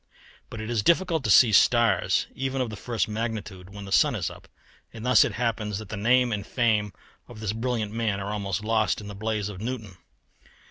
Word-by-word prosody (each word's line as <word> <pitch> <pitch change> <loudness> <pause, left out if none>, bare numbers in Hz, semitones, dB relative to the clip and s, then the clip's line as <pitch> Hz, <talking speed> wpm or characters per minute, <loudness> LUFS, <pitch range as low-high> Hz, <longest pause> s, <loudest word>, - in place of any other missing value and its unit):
But 115 - -8
it 110 +2 -5
is 115 -3 +1
difficult 170 - +2
to - - 0
see 110 +3 +7
stars 120 +3 +3
even 135 0 -3
of 125 -3 -1
the - - -6
first 115 +1 -2
magnitude 105 -4 -5
when 100 0 -9
the 95 - -9
sun - - +4
is - - -2
up, - - -14 0.4
and 115 0 -9
thus 125 -3 +6
it - - -2
happens 110 -4 -2
that 105 -1 -9
the 110 - -4
name 120 +4 +3
and 105 -2 -2
fame 110 -2 0 0.4
of 120 -3 -12
this 110 -2 -2
brilliant 115 -2 -2
man 110 -3 -1
are 100 +1 -4
almost 100 -1 -3
lost 110 0 +1
in 105 - -9
the 105 - -7
blaze 105 0 -2
of 100 -2 -8
Newton. 110 -5 -5
110 Hz, 215 wpm, -26 LUFS, 105-120 Hz, 0.4 s, see